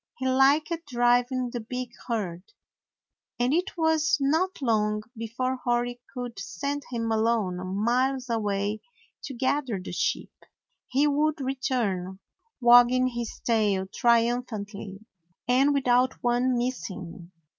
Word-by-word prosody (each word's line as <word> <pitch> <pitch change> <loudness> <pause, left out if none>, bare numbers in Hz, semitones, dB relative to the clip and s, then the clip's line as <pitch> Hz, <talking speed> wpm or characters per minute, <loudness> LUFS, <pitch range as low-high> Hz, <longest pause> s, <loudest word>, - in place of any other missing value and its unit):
He 260 - -2
liked 275 +5 +4 0.2
driving 245 0 +2
the 240 - -3
big 250 +2 -5 0.2
herd, 195 -8 -2 1.0
and 245 +3 +2
it 355 +3 -1
was 320 -3 +2
not 320 +7 +1
long 210 -4 +1
before 245 +3 -3
Hori 245 0 -1
could 245 -4 -6
send 195 +11 -4
him 230 -2 -2
alone 220 -5 0
miles 255 +4 +1
away 210 -2 -1 0.4
to 270 - -6
gather 260 -3 0
the 180 - -7
sheep. - - -1 0.5
He 275 +3 +2
would 300 +2 +1
re 265 0 -1
turn, 195 -9 -2 0.4
wagging 245 +1 +6
his 240 -2 -5
tail 210 -5 +1
triumphantly, 230 -4 0 0.4
and 260 +4 +4
with 275 -2 0
out 250 +1 +4
one 245 +1 +2
missing. 185 -8 -5
245 Hz, 125 wpm, -26 LUFS, 220-260 Hz, 1.0 s, wagging